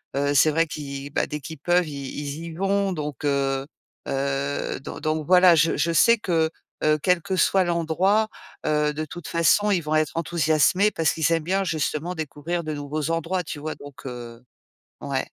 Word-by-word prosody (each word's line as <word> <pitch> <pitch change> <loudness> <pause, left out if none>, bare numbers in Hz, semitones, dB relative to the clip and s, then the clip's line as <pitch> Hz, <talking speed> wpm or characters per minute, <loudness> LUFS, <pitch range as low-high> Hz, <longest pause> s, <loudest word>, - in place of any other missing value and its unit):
heu, 140 +1 +1
c'est 145 +2 +5
vrai 165 +2 +2
qui, 140 -2 -6
bah, 145 - -1
dès 150 0 -5
qu'ils 160 +3 -8
peuvent, 175 +2 +2
ils 150 - -7 0.2
ils 145 +3 -5
y 165 - -7
vont, 195 +2 0
donc 150 -3 -5
heu, 135 -1 0 0.4
heu, 140 +1 -2
don - - -8
donc 155 0 -1
voilà, 180 -1 +7
je 165 +1 +3
je 170 - +1
sais 230 +8 +5
que, 165 -6 +1 0.3
heu, 155 0 +3
quel 180 -2 +3
que 190 +2 -2
soit 190 0 +3
l'endroit, 175 +6 +1 0.4
heu, 150 -1 +1
de 155 +1 -3
toute 155 +2 -8
façon, 170 +5 +3
ils 190 -4 +2
vont 155 0 -1
être 155 -2 +1
enthousiasmés 165 +4 +2
parce 160 -5 +1
qu'ils 160 -1 +1
aiment 165 -1 0
bien 190 +4 0
justement 160 +1 -2
découvrir 160 +2 -4
de 155 -1 -3
nouveaux 150 +2 -3
endroits, 165 +3 -1
tu 150 -2 -6
vois? 155 +1 -4
Donc 145 -2 -13
heu, 120 -2 -8 0.6
ouais. - - -2
155 Hz, 190 wpm, -24 LUFS, 145-175 Hz, 0.6 s, voilà